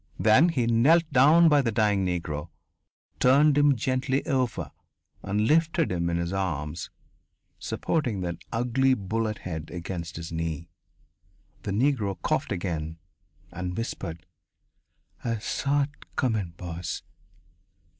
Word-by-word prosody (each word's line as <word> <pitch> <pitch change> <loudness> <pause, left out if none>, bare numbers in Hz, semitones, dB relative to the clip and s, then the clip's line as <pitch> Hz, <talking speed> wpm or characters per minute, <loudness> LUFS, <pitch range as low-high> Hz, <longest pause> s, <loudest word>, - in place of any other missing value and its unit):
Then 110 +11 +5
he 130 -8 0
knelt 125 +9 +5
down 155 +6 +7
by 150 -2 +5
the 120 -4 0
dying 105 -3 +2
Negro, 85 -3 -3 0.7
turned 140 +3 +5
him 145 -1 +5
gently 130 +2 0
over 130 -4 -1 0.5
and 105 +2 0
lifted 165 - +2
him 85 -1 0
in 85 - 0
his 85 +1 -2
arms, 85 -4 -3 0.7
supporting 125 - -1
that 85 -2 -3
ugly 125 +3 +2
bullet 110 +1 -2
head 80 -4 -6
against 85 -1 -5
his 85 0 -6
knee. 85 0 -4 0.9
The - - -4
Negro 105 -5 +1
coughed - - -1
again, 80 -3 -3 0.5
and 90 0 -5
whispered: 85 -8 -5 1.0
"I 115 -1 -1
saw 140 +6 0
it 145 +1 -10
comin', 110 - -1
boss." 85 -1 -5
105 Hz, 125 wpm, -27 LUFS, 85-130 Hz, 1.0 s, down